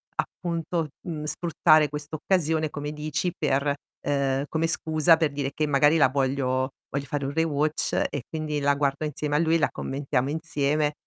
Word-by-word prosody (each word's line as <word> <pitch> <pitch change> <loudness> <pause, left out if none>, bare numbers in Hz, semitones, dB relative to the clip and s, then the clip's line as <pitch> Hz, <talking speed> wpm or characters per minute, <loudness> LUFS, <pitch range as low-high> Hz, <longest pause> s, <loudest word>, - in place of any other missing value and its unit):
appunto, 170 -1 -2 0.2
mhmm, 155 -3 -4
sfruttare 155 -2 +3
questa 150 +1 -6
occasione, 160 -2 +1
come 145 0 -4
dici, 155 +4 -2
per 140 -1 +1 0.3
ehm, 140 -1 0
come 160 +1 0
scusa 160 0 +3
per 160 -2 0
dire 140 -1 -2
che 155 0 0
magari 145 +2 +4
la 140 - +5
voglio 130 -1 0 0.2
voglio 140 0 -3
fare 145 0 -3
un 140 - -2
rewatch 155 -1 0 0.2
e 140 -4 -4
quindi 155 -2 -3
la 140 0 +3
guardo 140 +1 0
insieme 150 0 -2
a 150 - +4
lui, 165 0 +3
la - - +2
commentiamo 135 -1 -2
insieme, 150 -1 0
150 Hz, 170 wpm, -26 LUFS, 140-160 Hz, 0.3 s, la